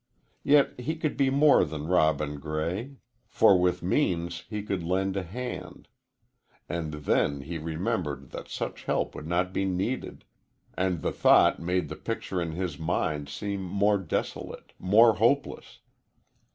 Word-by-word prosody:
Yet 140 -3 +3
he 155 +6 -2
could 155 -2 -2
be 135 -1 +2
more 140 +2 +5
than 75 -1 -5
Robin 75 -4 +1
Gray, 85 - -3 0.3
for 95 - +5
with 90 0 +1
means 85 - 0
he 105 -2 -4
could 100 -3 -2
lend 95 +3 -1
a 100 - 0
hand. 120 +8 -7 0.8
And 85 -2 -3
then 75 -1 0
he 80 +4 -5
remembered 80 -4 -3
that - - -7
such - - -5
help - - 0
would 75 - -8
not 90 +2 0
be 95 - 0
needed, 95 +7 -3 0.5
and 90 -2 -1
the - - 0
thought - - +5
made 90 -1 -1
the 75 - -6
picture 100 -5 -3
in 85 -2 -3
his 85 -3 -4
mind 75 -3 -1
seem 100 +6 -4
more 100 +2 +1
desolate 90 -5 -4
more 110 +3 +5
hopeless. 130 +7 0
90 Hz, 150 wpm, -27 LUFS, 80-105 Hz, 0.8 s, more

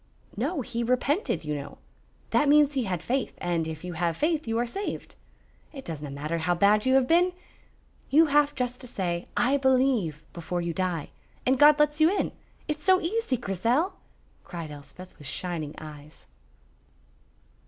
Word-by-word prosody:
"No, 280 - -1
he 235 -1 -3
repented, 255 - 0
you 150 - -2
know. 145 -1 -6 0.5
That 295 - +3
means 295 0 +5
he 265 -4 0
had 180 -4 -3
faith, 260 +1 -1
and 170 -2 -1
if 160 0 -6
you 180 -1 -5
have 165 0 -1
faith 310 -3 0
you 225 0 0
are 240 - +1
saved. 395 - -5 0.6
It 270 -3 -9
doesna 150 -3 -5
matter 150 +4 -3
how 175 +2 +1
bad 210 +6 +3
you 260 - +4
have 265 -2 +4
been. 355 +2 +4 0.8
You 315 +4 +6
have 295 -1 +3
just 250 0 -2
to 250 - -3
say 175 -5 -3
'I 265 +3 +3
believe' 255 - +2
before 175 +1 -3
you 170 -1 -2
die, 175 -4 -2 0.4
and 260 0 +2
God 295 0 +8
lets 300 +1 +2
you 315 - +7
in. 400 - 0 0.4
It's 300 -1 -3
so 375 -1 +5
easy, 390 - -1
Grizel," 235 - 0 0.5
cried 165 -4 -7
Elspeth, 150 +6 -11
with 145 - -9
shining 165 -5 -4
eyes. 150 0 -11
235 Hz, 170 wpm, -27 LUFS, -, 0.8 s, God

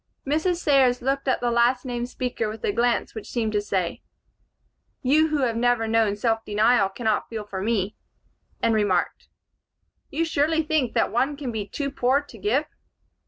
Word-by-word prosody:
Mrs. 315 +6 +1
Sayers 265 -7 +3
looked 275 +1 -1
at 260 - +1
the 240 -1 +1
last 240 +2 +2
named 245 -1 -3
speaker 250 -4 -3
with 220 +1 -8
a - - +1
glance 235 +3 0
which 220 - -8
seemed 225 -3 -1
to 210 -1 +1
say, 190 -4 -2 1.0
"You 305 +5 +4
who 300 -3 0
have 235 -3 0
never 240 -1 +1
known 220 -2 +2
self 225 +1 0
denial 210 -1 +3
cannot 220 +1 -1
feel 220 -2 -5
for 190 -2 -5
me," 205 -2 -1 0.7
and 230 - +3
remarked, 205 -5 0 0.8
"You 330 +3 -1
surely 320 +1 +1
think 300 -6 0
one 270 +5 +1
can 275 -4 -4
be 215 -3 -4
too 280 +3 -3
poor 265 0 +2
to 285 -5 -12
give?" 250 +10 +1
240 Hz, 170 wpm, -24 LUFS, 220-275 Hz, 1.0 s, You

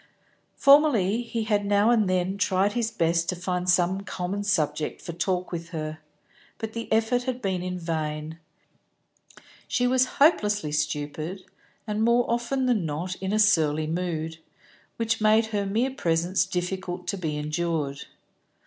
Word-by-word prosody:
Formerly 270 -8 +5
he 230 -1 -3
had 210 -2 +1
now 205 +3 +3
and 215 -5 +3
then 185 +1 0
tried 200 0 +2
his 235 -2 0
best 170 -5 0
to 180 - 0
find 180 0 -2
some 180 +2 +2
common 200 +1 -4
subject 155 -6 0
for 170 - -7
talk 180 +2 -1
with 170 -1 -5
her, 155 -2 -5 0.6
but 220 0 -5
the 230 0 -6
effort 235 +3 +2
had 255 -1 -2
been 185 -3 -2
vain; 160 -1 -4 1.3
she 245 - +1
was 255 +1 +3
hopelessly 210 - +3
stupid, 150 +4 -3 0.4
and 210 -1 -2
more 235 +2 +3
often 240 +3 0
than 240 -7 +2
not 160 +4 -3
in 190 0 -3
a 215 - +1
surly 160 -8 +3
mood, 165 -1 -3 0.6
which 225 -1 -1
made 215 +1 +4
her 200 -1 0
mere 230 +7 0
presence 175 -4 0
difficult 180 0 -3
to - - -2
be 160 -5 -3
endured. 150 -2 -2
185 Hz, 150 wpm, -26 LUFS, 165-220 Hz, 1.3 s, Formerly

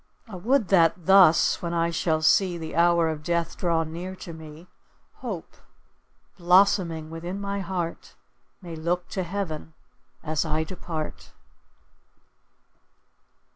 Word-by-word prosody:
I 215 - -9
would 220 +3 +1
that 170 -2 +3
thus, 190 -4 +5
when 170 -1 -3
I 170 0 +1
shall 160 -1 0
see 180 +2 +3
The 160 -2 -7
hour 170 0 +4
of 155 -1 -4
death 170 +1 -1
draw 170 -2 0
near 170 +4 -6
to 170 -2 -9
me, 160 +1 -11 0.5
Hope, - - -7 0.8
blossoming 175 -3 +3
within 175 +4 -5
my 200 0 -3
heart, 175 -3 -5 0.5
May 170 -2 -7
look 175 +3 -2
to 190 - -3
heaven 170 -4 -5 0.5
as 155 -1 -1
I 155 -1 -1
depart. 160 -2 -7
170 Hz, 125 wpm, -25 LUFS, 160-185 Hz, 0.8 s, thus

